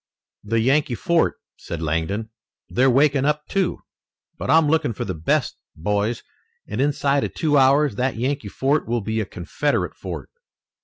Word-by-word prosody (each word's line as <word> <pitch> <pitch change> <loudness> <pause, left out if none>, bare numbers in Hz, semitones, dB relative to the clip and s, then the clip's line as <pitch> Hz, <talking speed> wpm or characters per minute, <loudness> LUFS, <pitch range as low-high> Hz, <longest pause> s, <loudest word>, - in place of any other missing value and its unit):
"The 115 +2 0
Yankee 135 +1 +2
fort," 170 +7 +1 0.2
said 85 - -6
Langdon. 85 +8 -2 0.4
"They're 130 +2 +3
waking 140 +1 +3
up, 150 0 0
too. 195 -3 -1 0.5
But - - -6
I'm 160 -1 +5
looking 155 -5 +1
for - - -4
the 95 - -3
best, 80 -1 0 0.2
boys, 105 +7 -1 0.4
and 105 +5 -2
inside 140 0 +1
of - - -4
two 155 -3 +1
hours 140 -3 +4
that 130 +1 0
Yankee 130 0 -2
fort 140 +8 0
will 120 0 0
be 110 +2 -2
a - - -2
Confederate 95 +12 -2
fort." - - -7
130 Hz, 160 wpm, -22 LUFS, 105-145 Hz, 0.5 s, I'm